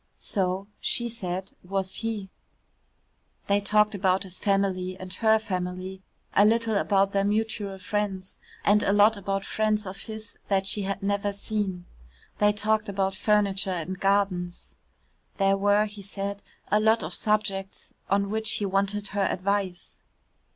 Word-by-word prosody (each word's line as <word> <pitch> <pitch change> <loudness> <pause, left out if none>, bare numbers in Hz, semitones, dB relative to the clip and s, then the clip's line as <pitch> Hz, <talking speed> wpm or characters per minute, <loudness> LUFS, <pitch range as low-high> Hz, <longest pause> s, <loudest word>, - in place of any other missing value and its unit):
So, 190 0 -1
she 240 0 0
said, 190 -5 -4
was 190 0 -2
he. 215 -4 -4 1.1
They 200 0 +2
talked 210 +1 +3
about 190 -1 +1
his 185 -1 -6
family 190 -2 0
and 185 0 -3
her 220 +3 +4
family 185 -2 -4 0.3
a 200 - +7
little 225 +1 +3
about 195 -1 +2
their 195 0 +1
mutual 205 -1 -1
friends 190 -1 -3 0.3
and 210 +1 +5
a 200 - +2
lot 205 +2 +6
about 195 -1 -2
friends 215 -1 +1
of 190 +1 -6
his 220 0 -7
that 195 -1 +2
she 205 +2 +1
had 195 0 -3
never 200 0 0
seen. 200 -3 -2 0.5
They 210 0 +5
talked 215 +1 0
about 195 -1 0
furniture 200 -1 +1
and 185 +1 -3
gardens. 195 -3 0 0.6
There 195 0 +3
were, 205 +1 +3
he 205 -1 -9
said, 200 +1 -4 0.3
a 210 - +5
lot 220 +1 +3
of - - -4
subjects 200 -2 -1 0.2
on 200 0 +1
which 220 0 +1
he 205 - -1
wanted 200 +1 0
her 200 -1 0
advice. 190 -1 -2
200 Hz, 150 wpm, -27 LUFS, 190-210 Hz, 1.1 s, a